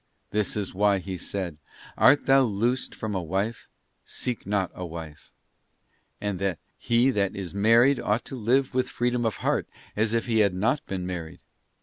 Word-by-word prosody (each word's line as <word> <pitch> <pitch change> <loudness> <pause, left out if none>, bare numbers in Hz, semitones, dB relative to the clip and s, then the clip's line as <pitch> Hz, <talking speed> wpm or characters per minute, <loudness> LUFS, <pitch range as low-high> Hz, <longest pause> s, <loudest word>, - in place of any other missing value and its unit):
This 105 0 0
is 100 -2 -3
why 100 +1 +3
he 95 0 -5
said: 90 -2 -5 0.4
'Art 145 +3 +5
thou 135 0 +6
loosed 120 +2 0
from 110 -1 -4
a 95 - -1
wife? 95 +7 -2 0.4
seek 120 -6 -4
not 100 -3 0
a 90 - -7
wife.'{ 80 -3 -8 1.5
He 120 +3 +2
that 100 -5 0
is 95 -3 -5
married 115 +7 +4
ought 105 +3 0
to - - -6
live 130 +4 +1
with 130 0 0
freedom 120 -1 0
of 110 - -2
heart, - - +1 0.3
as 110 +1 +1
if 115 - 0
he 115 -2 +1
had 100 -3 +3
not 125 +10 +1
been 95 -2 -3
married. 85 -3 -6
105 Hz, 165 wpm, -26 LUFS, 95-120 Hz, 1.5 s, thou